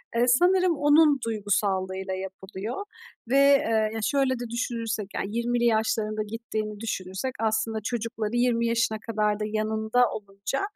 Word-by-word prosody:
eee, 240 +1 +3
sanırım 355 +6 +4
onun 295 0 +5
duygusallığıyla 190 -3 -1
yapılıyor. 190 - -6 0.5
Ve, 270 - +3
eee, 275 -6 +4
ya, 225 - -3
şöyle 270 -2 +1
de 240 -1 -5
düşünürsek, 230 -3 -3
yani, 210 +4 -3
20'li 240 0 +1
yaşlarında 220 -1 +1
gittiğini 215 -1 -5
düşünürsek 200 +2 -4
aslında 220 0 0
çocukları 230 -1 -3
20 240 -1 +2
yaşına 230 -2 +1
kadar 215 -2 -1
da 215 - -2
yanında 220 +3 +1
olunca, 200 +4 -4
225 Hz, 135 wpm, -26 LUFS, 210-245 Hz, 0.5 s, onun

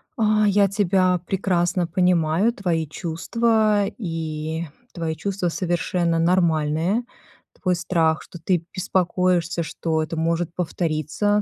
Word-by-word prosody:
А, 215 -2 +3
я 200 0 +4
тебя 185 -2 +2
прекрасно 180 -1 0
понимаю, 180 +3 +2
твои 170 -6 -1
чувства, 210 +6 +1
и 160 -3 -4 0.3
твои 165 -2 -3
чувства 190 -1 -2
совершенно 175 -1 0
нормальные. 170 +3 +2 0.6
Твой 180 -1 +2
страх, 165 -2 +1
что 175 - -12
ты 170 0 0
беспокоишься, 180 -2 0
что 160 0 -2
это 155 - -5
может 165 +1 -1
повториться 175 +4 0
175 Hz, 110 wpm, -23 LUFS, 165-195 Hz, 0.6 s, я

